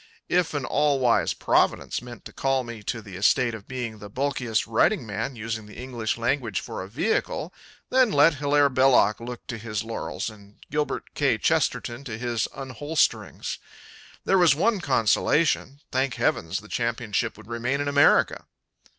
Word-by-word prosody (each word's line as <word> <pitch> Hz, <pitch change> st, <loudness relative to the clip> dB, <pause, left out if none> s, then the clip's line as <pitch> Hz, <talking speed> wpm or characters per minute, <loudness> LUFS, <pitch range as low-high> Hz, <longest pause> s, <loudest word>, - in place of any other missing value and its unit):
If 175 Hz, -3 st, +1 dB
an 140 Hz, -2 st, -1 dB
all 145 Hz, 0 st, +2 dB
wise 125 Hz, -3 st, +2 dB
Providence -, -, +1 dB
meant 120 Hz, -2 st, -11 dB
to -, -, -10 dB
call 135 Hz, -1 st, 0 dB
me 120 Hz, -2 st, -8 dB
to 110 Hz, +2 st, -4 dB
the 100 Hz, -3 st, -10 dB
estate 115 Hz, +5 st, +3 dB
of 110 Hz, -3 st, -9 dB
being 120 Hz, -4 st, -5 dB
the 105 Hz, 0 st, -9 dB
bulkiest 125 Hz, -2 st, -1 dB
writing 120 Hz, -, +2 dB
man 110 Hz, +5 st, -4 dB
using 110 Hz, -1 st, -5 dB
the 105 Hz, -, -13 dB
English 120 Hz, -3 st, -3 dB
language 120 Hz, -3 st, 0 dB
for -, -, -6 dB
a 95 Hz, -, -8 dB
vehicle, 155 Hz, -, -1 dB, 0.4 s
then 255 Hz, -3 st, +4 dB
let 150 Hz, +1 st, +5 dB
Hilaire 145 Hz, 0 st, +3 dB
Belloc 130 Hz, -5 st, +4 dB
look 120 Hz, +1 st, -8 dB
to 115 Hz, -3 st, -6 dB
his 105 Hz, -2 st, -3 dB
laurels 115 Hz, 0 st, -4 dB
and 105 Hz, -2 st, -11 dB, 0.2 s
Gilbert 150 Hz, 0 st, -2 dB
K. -, -, +2 dB
Chesterton 120 Hz, +3 st, 0 dB
to 110 Hz, -5 st, -5 dB
his 120 Hz, -2 st, -1 dB
unholsterings. 140 Hz, +4 st, -1 dB, 0.7 s
There 195 Hz, -, +4 dB
was 170 Hz, -5 st, +6 dB
one 205 Hz, +5 st, +1 dB
consolation: 140 Hz, +2 st, +2 dB
Thank 130 Hz, 0 st, 0 dB
heavens 80 Hz, +4 st, 0 dB
the 105 Hz, -, -14 dB
championship 115 Hz, -3 st, -2 dB
would -, -, -13 dB
remain 120 Hz, +5 st, -2 dB
in 145 Hz, -, -1 dB
America! 145 Hz, 0 st, +4 dB
125 Hz, 165 wpm, -25 LUFS, 110-145 Hz, 0.7 s, was